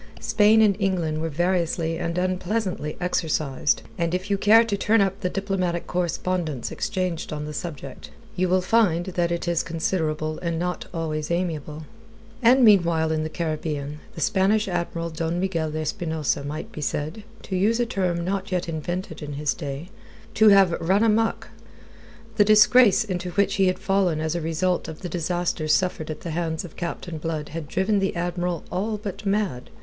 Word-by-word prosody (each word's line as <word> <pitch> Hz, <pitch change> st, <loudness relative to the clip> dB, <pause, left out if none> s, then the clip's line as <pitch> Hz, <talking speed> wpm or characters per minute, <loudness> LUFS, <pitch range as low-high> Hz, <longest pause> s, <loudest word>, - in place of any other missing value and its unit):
Spain 220 Hz, 0 st, +4 dB
and 205 Hz, -2 st, +4 dB
England 170 Hz, -6 st, 0 dB
were 165 Hz, -, -1 dB
variously 170 Hz, 0 st, 0 dB
and 170 Hz, 0 st, -2 dB
unpleasantly 185 Hz, -2 st, -1 dB
exercised, 155 Hz, -6 st, 0 dB, 0.2 s
and 170 Hz, +1 st, 0 dB
if 185 Hz, +3 st, -4 dB
you -, -, +4 dB
care 220 Hz, +3 st, +6 dB
to 225 Hz, -3 st, -1 dB
turn 215 Hz, +3 st, +2 dB
up 195 Hz, 0 st, +1 dB
the 180 Hz, -3 st, -1 dB
diplomatic 185 Hz, -3 st, -2 dB
correspondence 175 Hz, -5 st, -2 dB
exchanged 185 Hz, -5 st, -2 dB
on 150 Hz, -1 st, -4 dB
the 150 Hz, -, -6 dB
subject, 145 Hz, -5 st, -7 dB, 0.3 s
you 185 Hz, -1 st, +1 dB
will 185 Hz, +1 st, +3 dB
find 185 Hz, -4 st, +3 dB
that 175 Hz, -2 st, -1 dB
it 170 Hz, +1 st, -2 dB
is 170 Hz, -1 st, +2 dB
considerable 155 Hz, -2 st, -2 dB
and 170 Hz, -2 st, -2 dB
not 180 Hz, +1 st, -3 dB
always 155 Hz, -2 st, -3 dB
amiable. 160 Hz, -3 st, -3 dB, 0.6 s
And 250 Hz, +2 st, +6 dB
meanwhile 170 Hz, -6 st, +4 dB
in 155 Hz, 0 st, 0 dB
the 155 Hz, -, -2 dB
Caribbean, 150 Hz, -3 st, -3 dB, 0.2 s
the 165 Hz, -, -6 dB
Spanish 200 Hz, +7 st, +2 dB
Admiral 170 Hz, -2 st, -2 dB
Don 165 Hz, +2 st, -2 dB
Miguel 170 Hz, -4 st, -1 dB
de 155 Hz, +1 st, -3 dB
Espinosa 155 Hz, -2 st, -1 dB
might 150 Hz, +2 st, -6 dB
be 150 Hz, -, -7 dB
said 150 Hz, +7 st, -3 dB, 0.2 s
to 190 Hz, -, -4 dB
use 215 Hz, +6 st, +2 dB
a 240 Hz, -, +2 dB
term 180 Hz, -6 st, -1 dB
not 195 Hz, +1 st, -2 dB
yet 180 Hz, -1 st, -1 dB
invented 175 Hz, +4 st, -4 dB
in 145 Hz, -1 st, -5 dB
his 145 Hz, +1 st, 0 dB
day 145 Hz, +2 st, -6 dB, 0.4 s
to 220 Hz, 0 st, +6 dB
have 195 Hz, -3 st, +6 dB
run 190 Hz, +6 st, +3 dB
amok. 225 Hz, 0 st, +1 dB, 0.9 s
The 205 Hz, -, +7 dB
disgrace 215 Hz, +2 st, +6 dB
into 185 Hz, -3 st, -3 dB
which 200 Hz, 0 st, +1 dB
he 195 Hz, -1 st, +4 dB
had 185 Hz, -, +1 dB
fallen 190 Hz, -5 st, +1 dB
as 160 Hz, 0 st, -1 dB
a 170 Hz, -, -2 dB
result 170 Hz, +3 st, 0 dB
of 160 Hz, -, -8 dB
the 180 Hz, -, -5 dB
disasters 170 Hz, -2 st, 0 dB
suffered 180 Hz, -4 st, -1 dB
at 155 Hz, -, -5 dB
the 170 Hz, -, -5 dB
hands 160 Hz, +1 st, -2 dB
of 170 Hz, -, -12 dB
Captain 170 Hz, -1 st, -5 dB
Blood 155 Hz, -2 st, -3 dB
had 160 Hz, -1 st, -6 dB
driven 200 Hz, +6 st, +1 dB
the 195 Hz, -1 st, -1 dB
Admiral 175 Hz, 0 st, -2 dB
all 210 Hz, +4 st, -1 dB
but 205 Hz, 0 st, -6 dB
mad. 195 Hz, -11 st, -1 dB
175 Hz, 180 wpm, -24 LUFS, 160-195 Hz, 0.9 s, The